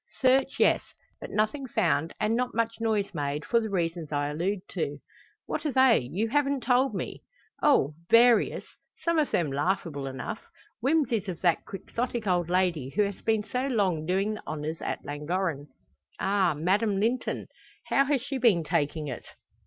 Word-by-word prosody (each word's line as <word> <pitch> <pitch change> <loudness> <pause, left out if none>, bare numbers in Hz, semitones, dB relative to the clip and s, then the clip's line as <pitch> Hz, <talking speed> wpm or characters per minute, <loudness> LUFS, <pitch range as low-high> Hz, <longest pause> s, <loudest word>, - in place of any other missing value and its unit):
"Search, 265 +1 +3
yes; - - +4 0.4
but - - -7
nothing 220 +6 -1
found, 150 - +1
and 215 +2 +1
not 250 -1 -1
much 230 0 0
noise 215 -3 0
made, 145 -1 -3
for 235 - +3
the 220 -1 -3
reasons 170 -4 -2
I 145 0 0
allude 180 +6 -1
to." - - -3 0.5
"What - - -3
are 300 - 0
they? 260 -3 +5
You 165 - -2
haven't 280 +1 +1
told 250 -1 +2
me." - - -5 0.4
"Oh! 215 - +4 0.2
various. 235 0 +5 0.4
Some 335 -1 +2
of 300 - +1
them 160 -5 0
laughable 145 -1 -1
enough. 135 - -5 0.4
Whimsies 245 -6 +1
of 175 - -5
that 175 -3 +2
Quixotic 235 +3 -4
old 175 -3 +1
lady 175 -7 +1
who 210 - +4
has 200 -1 -4
been 220 -2 +1
so 250 +5 -2
long 190 - 0
doing 195 +4 +1
the 215 - -9
honours 155 +1 -4
at - - -4
Llangorren." 150 +1 -2 0.5
"Ah! 190 -4 +2
Madame 195 +6 +1
Linton. 235 +5 -1 0.4
How 275 - +3
has 275 -3 +1
she 275 -1 -3
been 215 -9 +4
taking 155 -1 -1
it?" 125 -4 -6
200 Hz, 170 wpm, -28 LUFS, 160-240 Hz, 0.5 s, they